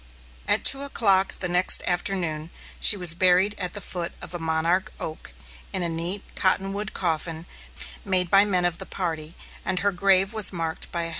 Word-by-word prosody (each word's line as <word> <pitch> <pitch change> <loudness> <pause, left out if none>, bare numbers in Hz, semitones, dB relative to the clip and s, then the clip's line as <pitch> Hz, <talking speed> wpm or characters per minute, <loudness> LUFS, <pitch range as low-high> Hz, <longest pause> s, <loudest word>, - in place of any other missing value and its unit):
At - - +1
two 275 - +6
o'clock 200 -9 +1
the 180 - 0
next 180 +1 +1
afternoon, 175 -4 -2 0.3
she 205 - +7
was 175 -3 +6
buried 185 +3 +2
at 180 -2 -2
the 205 - -5
foot 175 -3 -5
of 175 - -10
a 175 - -4
monarch 165 +5 -1
oak, 155 - -7 0.4
in 185 - -2
a 170 - -1
neat 170 +4 -2
cottonwood 195 +2 -1
coffin, 165 -1 -3 0.6
made 185 -3 0
by 195 0 +6
men 185 -4 0
of 175 -1 -2
the - - -8
party, 165 -3 -5 0.3
and 185 -1 -2
her 200 +1 +1
grave 195 +2 +2
was 215 -2 +6
marked 165 -3 -5
by 170 - -3
a - - -3
headstone. 165 - -4
180 Hz, 190 wpm, -24 LUFS, 170-195 Hz, 0.6 s, she